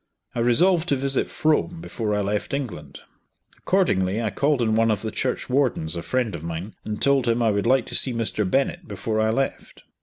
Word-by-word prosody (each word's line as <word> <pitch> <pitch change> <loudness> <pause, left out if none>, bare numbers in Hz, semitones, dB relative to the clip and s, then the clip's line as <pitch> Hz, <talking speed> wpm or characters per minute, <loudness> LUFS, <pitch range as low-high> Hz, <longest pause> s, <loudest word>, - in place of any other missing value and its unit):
I - - -3
resolved 165 +9 +3
to 140 - +3
visit 135 0 0
Frome 160 +2 0
before 110 -10 -3
I 105 - 0
left 105 +6 -2
England. 90 - -6 0.6
Accordingly 105 - +1
I 110 -3 -1
called 145 -1 +1
on 110 -2 +1
one 115 +1 +3
of 105 -1 0
the 110 - -3
church 130 +3 -2
wardens, 125 - 0
a 85 - -3
friend 125 +3 -1
of 80 -2 -6
mine, 85 +5 -5
and 105 -1 -4
told 140 -3 +3
him 115 +1 +2
I 110 - +3
would 100 +2 0
like 130 -1 +3
to - - -5
see 130 - +4
Mr. 115 -2 -1
Bennett 165 - 0
before 110 -1 -3
I 110 - +2
left. 135 +5 -3
115 Hz, 210 wpm, -23 LUFS, 105-140 Hz, 0.6 s, see